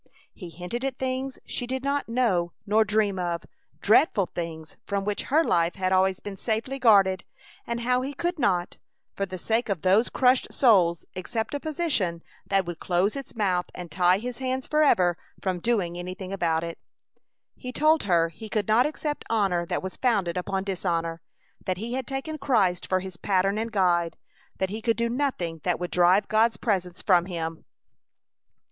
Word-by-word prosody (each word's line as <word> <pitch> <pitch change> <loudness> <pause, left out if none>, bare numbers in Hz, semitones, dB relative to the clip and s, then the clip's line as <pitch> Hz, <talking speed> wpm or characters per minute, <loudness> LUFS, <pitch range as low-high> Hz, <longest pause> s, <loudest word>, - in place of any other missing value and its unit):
He 180 -4 -9
hinted 180 - -5
at 270 -1 -2
things 260 0 -3
she 245 - -4
did 260 +1 -3
not 280 -2 -1
know 195 -8 +1
nor 215 +1 +4
dream 210 -2 +1
of; 175 -1 -2 0.4
dreadful 215 - +4
things 160 -2 -6
from 200 -1 -2
which 210 0 -2
her 310 +5 +4
life 170 - +1
had 185 -1 -1
always 190 0 +3
been 200 -1 -7
safely 230 +6 -2
guarded; 195 -6 +5 0.4
and 235 0 -2
how 250 +1 +2
he 275 +2 -4
could 345 +2 -2
not, 180 -7 0 0.4
for 195 - -2
the 185 0 -6
sake 225 +5 -1
of 190 -6 -2
those 195 +6 +4
crushed 255 0 +2
souls, 180 -9 +4
accept 220 +7 -3
a 285 - -1
position 275 - -1 0.2
that 195 -1 +2
would 175 -1 -6
close 185 +3 +1
his 275 -3 -8
mouth 185 -5 0
and 175 -3 -8
tie 180 +2 +4
his 245 +4 -6
hands 260 0 -2
forever 185 - +3 0.2
from 185 -2 -2
doing 190 -5 0
anything 185 +2 -6
about 165 -4 0
it. 170 0 -6 0.8
He 250 - -7
told 310 +4 +3
her 170 -3 +3
he 215 +7 -10
could 210 -2 -1
not 230 +5 +4
accept 300 -1 -4
honor 195 -6 +1
that - - -2
was 190 - -6
founded 200 -9 +1
upon 190 +1 -2
dishonor; 170 -4 -2 0.4
that 185 -1 -2
he 230 +5 -5
had 260 -1 -3
taken 290 +3 -4
Christ 205 -10 +1
for 185 0 +1
his 190 -2 -8
pattern 195 +2 +1
and 225 +1 -3
guide; 175 -4 +1 0.4
that 190 0 -1
he 215 +2 -4
could 230 0 +1
do 235 0 0
nothing 230 - -2
that 180 -2 0
would 180 0 -4
drive 180 +3 +4
God's 220 -1 +3
presence 185 -6 -2
from 180 -3 +4
him. 165 -3 -5
195 Hz, 180 wpm, -26 LUFS, 180-240 Hz, 0.8 s, guarded